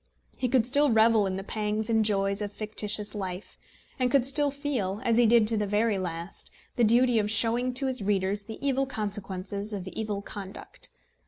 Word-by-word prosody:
He 250 Hz, -, -2 dB
could 245 Hz, -2 st, +3 dB
still 285 Hz, +4 st, +3 dB
revel 220 Hz, -2 st, +4 dB
in 185 Hz, -, -3 dB
the 195 Hz, -, -5 dB
pangs 210 Hz, +1 st, -2 dB
and 225 Hz, -1 st, +2 dB
joys 200 Hz, -1 st, +2 dB
of 205 Hz, -1 st, -3 dB
fictitious 210 Hz, 0 st, -2 dB
life, 190 Hz, -2 st, -6 dB, 0.4 s
and 250 Hz, -1 st, +2 dB
could 255 Hz, -1 st, +3 dB
still 285 Hz, +2 st, +3 dB
feel 270 Hz, -9 st, -3 dB
as 230 Hz, -1 st, +2 dB
he 240 Hz, -1 st, +5 dB
did 230 Hz, -1 st, +5 dB
to 225 Hz, -, +2 dB
the 210 Hz, -1 st, -1 dB
very 210 Hz, 0 st, +1 dB
last 170 Hz, 0 st, -5 dB, 0.3 s
the 240 Hz, -, +2 dB
duty 240 Hz, +1 st, +4 dB
of 210 Hz, 0 st, -1 dB
showing 235 Hz, +3 st, +2 dB
to 270 Hz, +2 st, +5 dB
his 260 Hz, -3 st, -2 dB
readers 200 Hz, 0 st, 0 dB
the 220 Hz, 0 st, -8 dB
evil 270 Hz, 0 st, +1 dB
consequences 205 Hz, -2 st, -4 dB
of 195 Hz, -2 st, -5 dB
evil 205 Hz, +1 st, -4 dB
conduct. 200 Hz, -2 st, -7 dB
215 Hz, 190 wpm, -27 LUFS, 200-240 Hz, 0.4 s, he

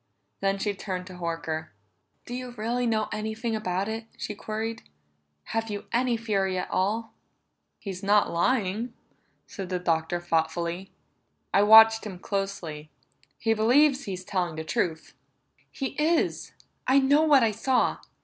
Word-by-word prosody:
Then 195 Hz, 0 st, +1 dB
she 205 Hz, +1 st, -1 dB
turned 185 Hz, -2 st, -5 dB
to 185 Hz, -, -10 dB
Horker. 165 Hz, -2 st, -3 dB, 0.6 s
"Do 245 Hz, -, -7 dB
you 250 Hz, -1 st, -6 dB
really 240 Hz, +3 st, -1 dB
know 215 Hz, -2 st, +1 dB
anything 220 Hz, +2 st, -2 dB
about 190 Hz, -2 st, -1 dB
it?" 225 Hz, +1 st, -4 dB
she -, -, -4 dB
queried. 220 Hz, +2 st, -4 dB, 0.7 s
"Have 225 Hz, 0 st, -1 dB
you 205 Hz, -1 st, -5 dB
any 240 Hz, 0 st, +2 dB
theory 195 Hz, -4 st, 0 dB
at 180 Hz, -, -4 dB
all?" 215 Hz, +5 st, 0 dB, 0.6 s
"He's 190 Hz, -3 st, -6 dB
not 205 Hz, +1 st, +3 dB
lying," 220 Hz, +4 st, 0 dB, 0.5 s
said 190 Hz, -2 st, -7 dB
the 185 Hz, -, 0 dB
Doctor 165 Hz, -1 st, 0 dB
thoughtfully. 170 Hz, +2 st, -1 dB, 0.6 s
"I 200 Hz, -, +5 dB
watched 220 Hz, +1 st, +8 dB
him 190 Hz, -3 st, -7 dB
closely; 175 Hz, -6 st, -4 dB, 0.5 s
he 225 Hz, -1 st, +1 dB
believes 265 Hz, +6 st, +4 dB
he's 185 Hz, -2 st, -5 dB
telling 180 Hz, -4 st, -2 dB
the 160 Hz, -, -4 dB
truth." 160 Hz, 0 st, -2 dB, 0.6 s
"He 270 Hz, -2 st, -3 dB
is. 330 Hz, +1 st, +1 dB, 0.4 s
I 260 Hz, +2 st, +5 dB
know 280 Hz, +2 st, +5 dB
what 295 Hz, -5 st, +5 dB
I 225 Hz, -, +3 dB
saw!" 245 Hz, +4 st, +1 dB
210 Hz, 145 wpm, -27 LUFS, 185-230 Hz, 0.7 s, watched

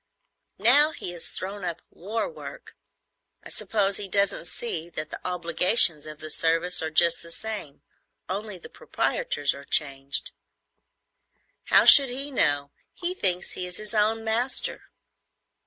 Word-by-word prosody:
"Now 275 Hz, +9 st, +5 dB
he 175 Hz, -, -6 dB
has 175 Hz, -2 st, -3 dB
thrown 195 Hz, +2 st, -6 dB
up 170 Hz, -1 st, -5 dB
war 215 Hz, +6 st, -4 dB
work, 485 Hz, -, -11 dB, 0.7 s
I -, -, -11 dB
suppose 200 Hz, -3 st, -1 dB
he 205 Hz, -, -3 dB
doesn't 200 Hz, -2 st, 0 dB
see 170 Hz, -6 st, -6 dB
that 155 Hz, -2 st, -6 dB
the -, -, -7 dB
obligations 175 Hz, -2 st, +2 dB
of 155 Hz, -1 st, -10 dB
the 155 Hz, 0 st, -6 dB
service 165 Hz, +3 st, +2 dB
are 160 Hz, -, -3 dB
just 170 Hz, +2 st, +3 dB
the 170 Hz, -, -10 dB
same, 170 Hz, -7 st, -7 dB, 0.4 s
only 200 Hz, +1 st, -5 dB
the 175 Hz, -, -12 dB
proprietors 145 Hz, -1 st, -2 dB
are 140 Hz, -, -11 dB
changed." 140 Hz, -1 st, 0 dB, 1.3 s
"How -, -, +4 dB
should 275 Hz, -2 st, +10 dB
he 275 Hz, +4 st, -5 dB
know? 145 Hz, -, 0 dB, 0.2 s
He 355 Hz, 0 st, -2 dB
thinks 180 Hz, -, -1 dB
he 180 Hz, -, -6 dB
is 180 Hz, -, -5 dB
his 215 Hz, 0 st, -6 dB
own 220 Hz, +1 st, 0 dB
master." 230 Hz, +4 st, -1 dB
180 Hz, 145 wpm, -25 LUFS, 160-220 Hz, 1.3 s, should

